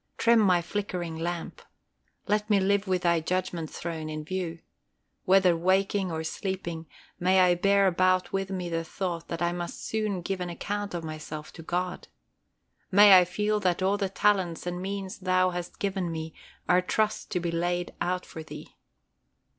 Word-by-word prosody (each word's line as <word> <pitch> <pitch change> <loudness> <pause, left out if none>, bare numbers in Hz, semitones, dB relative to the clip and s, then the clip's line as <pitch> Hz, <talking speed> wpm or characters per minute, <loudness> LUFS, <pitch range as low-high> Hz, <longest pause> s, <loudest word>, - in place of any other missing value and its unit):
Trim 235 0 +5
my 180 -5 +4
flickering 180 -3 -3
lamp. 170 +1 -4 0.6
Let 210 +1 0
me 205 -2 +4
live 200 +1 +1
with 185 -1 0
Thy 170 -1 +3
Judgment 170 -1 -2
throne 160 -2 -5
in 155 0 -5
view. 175 -1 -3 0.7
Whether 190 -2 +5
waking 190 +2 +1
or 160 0 -3
sleeping, 170 -1 -4 0.3
may 185 +2 +4
I 180 -1 +6
bear 200 +3 +3
about 185 0 +2
with 195 0 -1
me 185 -2 -3
the 165 -1 -2
thought 170 0 -4
that 170 0 -3
I 170 - +2
must 175 0 -5
soon 210 -5 -2
give 190 0 -3
an 180 - -3
account 205 +3 -4
of 170 - -4
myself 155 -1 -7
to 165 - -10
God. 180 +2 -3 0.8
May 200 0 +8
I 180 - +3
feel 210 +4 0
that 185 -2 0
all 195 +2 +2
the 195 -2 -1
talents 190 -4 +1
and 175 0 -3
means 195 0 -5
Thou 185 -1 +2
hast 175 -1 -6
given 190 -3 -2
me 160 -1 -5 0.3
are 180 +1 +4
trusts 215 +4 0
to 180 - -2
be 170 -1 -2
laid 175 +1 -1
out 180 +1 -1
for 160 - -8
Thee. 160 - -10
180 Hz, 175 wpm, -28 LUFS, 170-195 Hz, 0.8 s, May